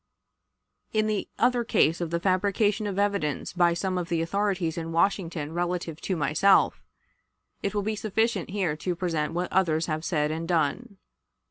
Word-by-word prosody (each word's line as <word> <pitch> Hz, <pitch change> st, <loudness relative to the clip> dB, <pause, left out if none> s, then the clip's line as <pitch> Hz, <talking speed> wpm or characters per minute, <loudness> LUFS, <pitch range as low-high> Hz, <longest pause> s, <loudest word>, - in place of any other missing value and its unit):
In 215 Hz, -1 st, +2 dB
the 215 Hz, -2 st, -1 dB
other 245 Hz, 0 st, +2 dB
case 165 Hz, -6 st, +2 dB
of 170 Hz, -, -2 dB
the 170 Hz, +1 st, -1 dB
fabrication 200 Hz, +3 st, +1 dB
of 195 Hz, -2 st, -4 dB
evidence 200 Hz, -8 st, -1 dB
by 175 Hz, -1 st, +3 dB
some 185 Hz, +1 st, -1 dB
of 175 Hz, 0 st, -5 dB
the 165 Hz, -1 st, +1 dB
authorities 190 Hz, -2 st, -1 dB
in 165 Hz, -1 st, -4 dB
Washington 165 Hz, -3 st, 0 dB
relative 175 Hz, -2 st, -2 dB
to 190 Hz, -, -1 dB
myself, 160 Hz, +6 st, +3 dB, 0.8 s
it 200 Hz, -, -2 dB
will 205 Hz, -, 0 dB
be 215 Hz, +1 st, -1 dB
sufficient 215 Hz, -2 st, 0 dB
here 185 Hz, -6 st, -1 dB
to 180 Hz, +3 st, -2 dB
present 165 Hz, -3 st, -1 dB
what 175 Hz, +1 st, -2 dB
others 165 Hz, -4 st, +2 dB
have 155 Hz, -1 st, -3 dB
said 150 Hz, -3 st, 0 dB
and 165 Hz, +1 st, -4 dB
done. 180 Hz, +6 st, -1 dB
180 Hz, 165 wpm, -27 LUFS, 165-200 Hz, 0.8 s, by